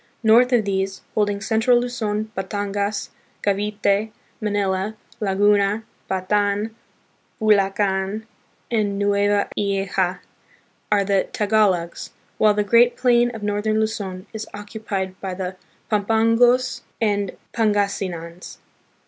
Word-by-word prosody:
North 235 +3 +5
of 235 -4 +3
these, 195 -1 -2
holding 205 -1 0
central 225 +3 +3
Luzon, 220 -3 -2
Batangas, 200 +1 -2 0.3
Cavite, 205 +1 +1 0.3
Manila, 205 -1 -1 0.2
Laguna, 205 +1 +2 0.3
Bataan, 205 +3 0 0.7
Bulacan, 200 -1 +1 0.5
and 210 -3 0
Nueva 205 0 +2
Ecija, 195 -2 0 0.7
are 205 -1 +4
the 195 -1 +1
Tagalogs, 200 -5 +1 0.3
while 210 -1 +5
the 210 - +2
great 235 +4 +4
plain 240 -1 +4
of 220 - -7
northern 210 +1 0
Luzon 200 -4 -3
is 220 0 -5
occupied 205 -3 -5
by 190 -2 -4
the 185 0 -4 0.4
Pampangos 230 +4 +3 0.2
and 205 -3 0 0.2
Pangasinans. 195 -6 -1
205 Hz, 100 wpm, -22 LUFS, 195-220 Hz, 0.7 s, North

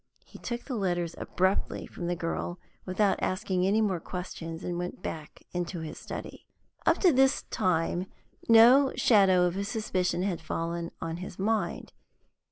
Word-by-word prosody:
He - - -14
took 240 -1 -4
the 270 - -6
letters 175 -6 -1
abruptly 190 +2 0
from 175 - -6
the 175 - 0
girl, 170 +1 -3 0.3
without 195 +2 +1
asking 185 -1 0
any 210 +3 +3
more 195 -5 +1
questions, 165 -1 -6
and 175 -1 -3
went 180 +1 -5
back 155 -2 -7
into 175 -1 -3
his 160 - -7
study. - - -8 0.4
Up - - +5
to 365 - +6
this 270 +1 +3
time 175 +1 0 0.4
no 245 +5 +7
shadow 195 -5 +5
of 175 0 0
a 200 - -1
suspicion 195 -5 -1
had 180 -4 -2
fallen 170 +1 -3
on 165 0 -3
his 180 0 -8
mind. 215 +3 -1
185 Hz, 160 wpm, -29 LUFS, 175-210 Hz, 0.4 s, no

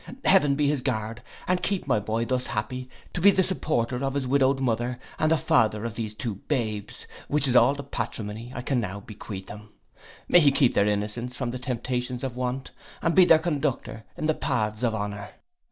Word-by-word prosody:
Heaven 150 -8 +5
be 145 0 +2
his 145 -2 +1
guard, 115 -2 -2 0.3
and 180 0 +1
keep 195 -4 -1
my 125 -6 +2
boy 110 +3 -1
thus 130 +1 -1
happy 125 +4 -4 0.2
to 175 - -2
be 200 - +8
the 190 -1 +3
supporter 135 -9 -1
of 135 0 -1
his 140 -2 0
widowed 135 0 +3
mother, 120 -1 -1 0.2
and 155 - +3
the 160 - +4
father 110 -6 +2
of 115 - -3
these 110 -2 -4
two 110 -3 -4
babes, 110 -8 -2 0.2
which 145 -1 +3
is 125 - +1
all 135 +3 +6
the 140 - -6
patrimony 115 -3 -4
I 125 - -4
can 130 0 0
now 100 -3 -4
bequeath 100 -2 -8
him. 105 0 -11 0.5
May 175 - +7
he 145 -4 +5
keep 135 -3 +3
their 100 - +3
innocence 105 +5 -2
from 125 -3 -2
the 125 - -5
temptations 125 0 -3
of 130 -2 -3
want, 125 +1 -3 0.3
and 165 - +2
be 185 +1 +7
their 165 - +7
conductor 150 -8 -2
in - - -3
the 155 - +3
paths 110 -8 -1
of 115 -3 +1
honour. 100 -1 -5
125 Hz, 205 wpm, -26 LUFS, 110-140 Hz, 0.5 s, be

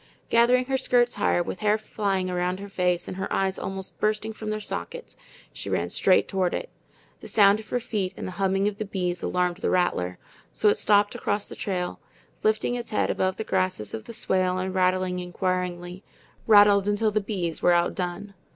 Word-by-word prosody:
Gathering 245 +2 +4
her 265 0 0
skirts 245 -2 +2
higher, 175 - +1
with 185 - -6
hair 215 0 +2
flying 200 -3 -2
around 180 +1 -1
her 200 - -7
face 180 -2 0
and 185 - -6
her 195 - -4
eyes 190 0 0
almost 190 0 -6
bursting 215 +1 0
from 215 0 -6
their 215 0 -2
sockets, 480 - -6 0.4
she - - -6
ran - - -1
straight - - +3
toward 190 -3 0
it. - - -5 0.5
The - - -10
sound 205 0 +5
of 220 - -12
her 245 - 0
feet 210 -6 -2
and - - -5
the - - -5
humming 195 +1 +1
of 205 -1 -3
the 215 - -2
bees 180 -3 -2
alarmed 180 -1 0
the - - -1
rattler, 90 - 0 0.3
so 210 - +2
it - - +1
stopped 205 0 +3
across 205 0 -1
the - - -10
trail, 180 -3 -3 0.4
lifting 215 +3 +1
its 240 -1 -4
head 215 - +1
above 185 0 0
the 220 - -3
grasses 185 - -1
of 110 - -6
the - - -9
swale 185 -5 0
and 185 0 -2
rattling 185 0 +1
inquiringly 180 0 -3 0.4
rattled 205 -2 +6
until 210 +1 +1
the 215 0 +1
bees 185 -6 -3
were 175 - +5
outdone. 180 +3 -1
195 Hz, 195 wpm, -25 LUFS, 180-215 Hz, 0.5 s, rattled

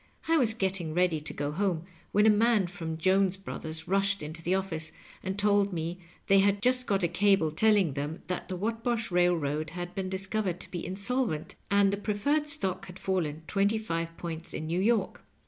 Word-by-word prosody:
I 330 - +4
was 230 -6 +2
getting 190 -6 -1
ready 175 -3 +2
to 150 - -5
go 145 0 -3
home, 175 -1 0 0.3
when 210 +1 +4
a 220 - +7
man 215 -1 +3
from 165 -3 -5
Jones 190 +2 +2
Brothers 160 -4 -6
mshed 195 +1 +1
into 160 +2 -6
the 175 +3 +1
office, 160 -5 -3 0.3
and 190 +1 -3
told 205 -1 +3
me 170 +1 -3 0.3
they 195 0 +5
had 200 +1 +3
jnst 255 +3 +2
got 195 -3 +1
a - - +4
cable 180 -2 +3
telling 200 -2 +3
them 145 +4 -4
that 180 -1 -4
the 185 - -4
Whatbosh 225 +2 -1
Bailroad 160 -4 +1
had 175 +1 -6
been 190 -1 -3
discovered 190 -1 -2
to - - -8
be 175 - -4
insolv^ 205 +2 0
ent, 150 - -9
and 200 0 +4
the - - 0
preferred 230 +10 0
stock 280 - -2
had 180 0 -10
fallen 160 -6 -2
twenty 200 +4 +2
five 165 -6 -3
points 165 -1 -6
in 155 - -4
New 170 +3 -1
York. 215 -1 +1
190 Hz, 200 wpm, -29 LUFS, 165-205 Hz, 0.3 s, a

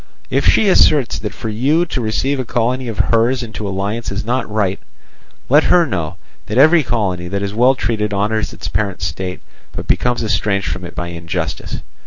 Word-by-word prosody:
"If 135 +2 +2
she 220 - +4
asserts 150 -8 +4
that 105 - -4
for 110 - -6
you 140 +11 +2
to 140 -6 -3
receive 130 +5 0
a - - 0
colony 125 +2 -1
of 110 -3 -5 0.2
hers 120 +3 +2
into 110 -2 -5
alliance 100 +4 -3
is 100 +1 -3
not 125 +2 -1
right, 105 -3 0 0.7
let 145 +4 +5
her 175 -1 +5
know 85 - -3 0.3
that 110 - -2
every 155 +5 +6
colony 95 -9 -1
that 100 +2 -3
is 100 0 -3
well 125 +4 +4
treated 105 -4 -1
honours 105 +2 0
its - - -7
parent 100 -6 -2
state, 90 +3 -4 0.3
but - - -5
becomes 120 -1 +1
estranged 100 -1 0
from 90 - -4
it - - -9
by 85 0 -4
injustice. 85 -1 -4
110 Hz, 190 wpm, -18 LUFS, 100-130 Hz, 0.7 s, every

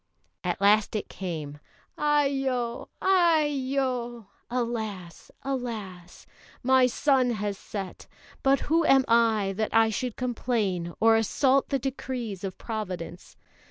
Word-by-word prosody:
At - - -1
last 210 +2 +3
it 210 - -3
came. 155 -6 -5 0.4
"Aiyo! 270 -5 0 0.2
Aiyo!" 275 - +1 0.2
(Alas! 220 -8 -4
Alas!) 215 -10 -5 0.4
"My 260 0 +5
sun 260 0 +2
has 205 -2 -2
set; 195 -1 -7 0.3
but 275 0 +3
who 330 +2 +2
am 270 -3 +5
I, 225 -4 +3
that 220 0 -1
I 225 0 +5
should 245 +2 -3
complain 220 -8 -1
or 225 0 +5
assault 265 +5 +2
the 275 - +1
decrees 250 -6 -4
of 190 -2 -5
Providence? 185 -6 -6
235 Hz, 115 wpm, -27 LUFS, 205-265 Hz, 0.4 s, My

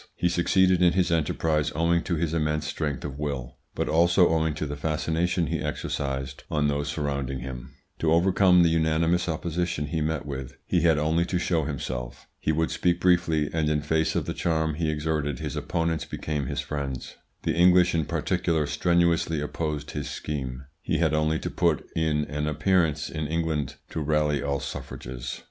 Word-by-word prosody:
He 90 - +1
succeeded 90 +1 +3
in 85 -1 +5
his 90 -2 +1
enterprise 75 -1 +1
owing 85 +2 +2
to 85 - 0
his 80 0 -1
immense 75 -1 0
strength 75 -3 -3
of 70 -1 -6
will, 70 -5 -4 0.2
but - - -1
also 85 +3 +4
owing 80 -1 +1
to 75 - -3
the 75 0 -4
fascination 80 +4 0
he - - -2
exercised 70 -1 -3
on 75 -1 +1
those 70 0 -1
surrounding 70 -3 -2
him. 65 -1 -8 0.2
To 80 - +1
overcome 90 +1 +5
the 85 - +4
unanimous 80 +2 +2
opposition 85 -1 -2
he 80 +2 -2
met 80 -1 -1
with, 65 -2 -6
he - - +1
had 80 -3 +4
only 80 +3 +2
to 90 - -1
show 85 -3 0
himself. 65 -4 -5
He - - 0
would 80 +1 0
speak 85 +1 +1
briefly, 85 -4 +2
and 80 -2 +1
in 75 -1 +1
face 80 +1 +1
of - - 0
the - - -3
charm 80 -2 0
he 80 +1 -1
exerted 75 -2 -1
his - - -4
opponents 85 -2 -1
became 75 -3 -3
his - - -2
friends. 70 -3 -5 0.3
The - - +1
English 90 +1 +5
in 80 -2 +1
particular 85 -3 0
strenuously 85 +1 +2
opposed 75 -1 -3
his 75 -1 -4
scheme; 65 -3 -5 0.2
he - - 0
had - - +2
only 75 +1 +2
to - - -4
put 85 -4 +1
in 75 -2 +1
an 75 +1 -3
appearance 80 -1 +1
in 80 -2 -4
England 75 -4 -1 0.2
to - - -3
rally 75 -1 +1
all 70 0 -1
suffrages. 65 -3 -6
80 Hz, 180 wpm, -26 LUFS, 75-85 Hz, 0.3 s, in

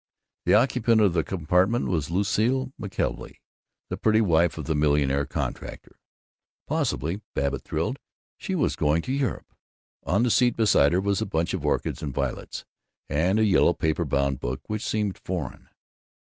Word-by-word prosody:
The - - +5
occupant 120 -3 +3
of 100 -5 +4
the 80 -2 +1
compartment 90 +7 +1
was 80 -6 -1
Lucile 110 +8 0
McKelvey, - - -3 0.5
the - - -3
pretty 110 0 +3
wife 85 -6 +2
of 80 - -5
the 80 - 0
millionaire 70 -2 +1
contractor. - - -6 0.7
Possibly, 80 - -1
Babbitt 70 0 -1
thrilled, - - -3 0.4
she - - -4
was - - +1
going 75 +3 +1
to 130 - -3
Europe! 135 -6 -2 0.5
On 100 +6 +1
the 125 - +2
seat 125 +1 +3
beside 95 -9 +4
her 90 - +2
was 100 -1 0
a - - -1
bunch 85 -3 -1
of - - -3
orchids - - -1
and 70 -4 -5
violets, 70 -3 -4 0.4
and 90 +7 +1
a 110 - +3
yellow 95 -3 +4
paper 80 -1 0
bound 70 -1 0
book 65 +1 -4
which 110 +1 -4
seemed 105 -3 -1
foreign. 85 -8 -5
90 Hz, 165 wpm, -25 LUFS, 75-110 Hz, 0.7 s, The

